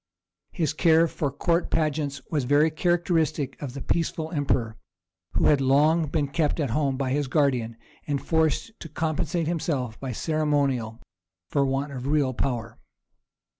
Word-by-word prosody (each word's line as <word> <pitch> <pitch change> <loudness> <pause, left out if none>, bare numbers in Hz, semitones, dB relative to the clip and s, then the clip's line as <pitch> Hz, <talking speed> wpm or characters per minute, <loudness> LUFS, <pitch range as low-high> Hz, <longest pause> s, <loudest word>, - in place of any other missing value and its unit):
His 160 -5 -1
care 165 0 +4
for 150 -2 -2
court 170 +4 0
pageants 150 -3 -1
was 145 -5 0
very 145 +4 +4
characteristic 160 -4 0
of 135 -3 -6
the 140 - -5
peaceful 165 -1 -1
emperor, 130 -7 0 0.6
who - - +1
had 145 -2 +4
long 150 +5 +3
been 145 0 0
kept 150 +2 0
at 140 -6 0
home 135 0 0
by 130 -1 -1
his 145 0 0
guardian, 125 -6 +1 0.3
and 145 -2 0
forced 160 - 0
to 165 - -8
compensate 160 +2 -1
himself 145 -8 -2
by 135 -2 -4
ceremonial 140 -5 0 0.5
for 145 - +1
the 140 - +4
want 135 +2 -1
of 130 -1 -5
real 145 -3 +2
power. 120 -3 -3
145 Hz, 155 wpm, -25 LUFS, 135-160 Hz, 0.6 s, care